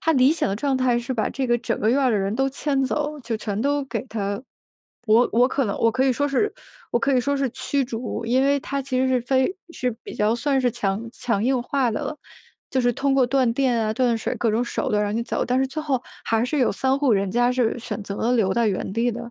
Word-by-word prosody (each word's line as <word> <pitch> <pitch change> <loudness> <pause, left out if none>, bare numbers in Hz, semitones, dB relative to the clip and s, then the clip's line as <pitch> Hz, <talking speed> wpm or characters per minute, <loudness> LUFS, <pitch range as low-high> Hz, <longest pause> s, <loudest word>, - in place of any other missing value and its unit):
他 325 - +2
理 265 +1 +5
想 325 - 0
的 195 - -1
状 270 +2 0
态 250 -2 +2
是 240 +2 -4
把 220 - 0
这 270 -1 -2
个 240 -1 +3
整 235 - -2
个 215 - +1
院 275 - +3
儿 260 -2 +3
的 215 - +2
人 195 +2 -1
都 270 +2 +1
迁 275 0 -1
走， 300 +2 -2
就 230 -2 -3
全 210 -1 -3
都 285 +2 +1
给 270 - -4
他 205 0 -3 0.6
我 225 +3 +5
我 245 +2 +5
可 275 -1 0
能 200 - -2
我 230 - +3
可 255 +4 +1
以 265 - +3
说 285 +4 0
是 345 +10 +1 0.4
我 240 - +3
可 275 +2 +1
以 250 - +4
说 280 +3 0
是 275 -2 0
驱 270 +2 -1
逐， 235 -1 -4
因 255 +3 +3
为 280 +1 +3
他 280 +1 -3
其 260 -1 -2
实 260 - +2
是 255 -1 +2
非 260 +7 +1 0.2
是 250 -6 -1
比 - - -8
较 210 +2 +2
算 270 +3 0
是 250 -1 +2
强 205 +2 -2
强 220 -4 -1
硬 255 +1 +2
化 260 -2 0
的 215 - -2
了。 300 - -4 0.5
就 260 - +1
是 245 -1 +2
通 275 +2 0
过 260 -2 +4
断 260 -1 +2
电 255 -2 +2
啊， 215 0 0
断 240 0 +1
水 - - -2
各 230 - +1
种 225 +3 +1
手 - - -2
段 210 0 +2
让 205 0 -1
你 230 - 0
走， - - -2
但 250 +1 +1
是 265 - +2
最 310 +4 -5
后 270 -5 -1 0.2
还 225 0 +1
是 290 +4 -1
有 255 - +3
3 265 +6 +1
户 275 -5 +3
人 195 -1 +1
家 245 +4 +2
是 250 -2 0
选 215 -3 -5
择 200 0 -6
了 235 +3 0
留 190 -4 +2
在 235 +1 +2
原 190 -1 -2
地 235 +2 +1
的。 235 +1 -7
245 Hz, 290 characters per minute, -23 LUFS, 225-270 Hz, 0.6 s, 理